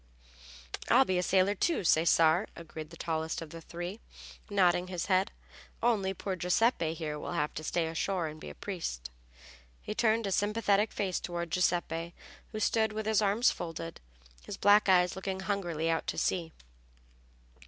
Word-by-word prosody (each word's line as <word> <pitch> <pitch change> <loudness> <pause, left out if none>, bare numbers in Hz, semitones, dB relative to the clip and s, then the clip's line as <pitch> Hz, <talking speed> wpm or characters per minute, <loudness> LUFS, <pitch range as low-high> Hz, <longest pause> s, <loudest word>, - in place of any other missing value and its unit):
"I'll 260 +3 +6
be 185 -4 +1
a - - +2
sailor 190 +2 +3
too, 320 - 0
Cesare," 165 +2 +4
agreed 155 -2 -8
the 170 - -12
tallest 160 0 -2
of 160 -2 -8
the 165 - -8
three, 175 +6 -6 0.5
nodding 180 -3 +3
his 180 -1 -3
head. 190 +2 +2 0.5
"Only 210 -5 +2
poor 190 +1 -3
Giuseppe 180 -2 +1
here 150 -2 -4
will - - -5
have 150 -3 -1
to 155 - -6
stay 165 +1 0
ashore 165 +2 -1
and 155 0 -7
be - - -7
a - - -10
priest." 60 - -5 0.7
He - - -5
turned 220 0 +2
a 195 - -2
sympathetic 205 +1 +2
face 190 -3 -1
toward 170 -1 -4
Giuseppe, 170 -1 0 0.4
who 215 - -4
stood 220 0 +2
with 215 0 -3
his 220 -1 +3
arms 210 +4 +3
folded, 165 -1 -6 0.4
his - - -7
black 205 0 +5
eyes 180 -1 +4
looking 190 0 -4
hungrily 180 -5 -2
out 165 0 0
to - - -2
sea. 170 -3 0
180 Hz, 165 wpm, -31 LUFS, 165-205 Hz, 0.7 s, I'll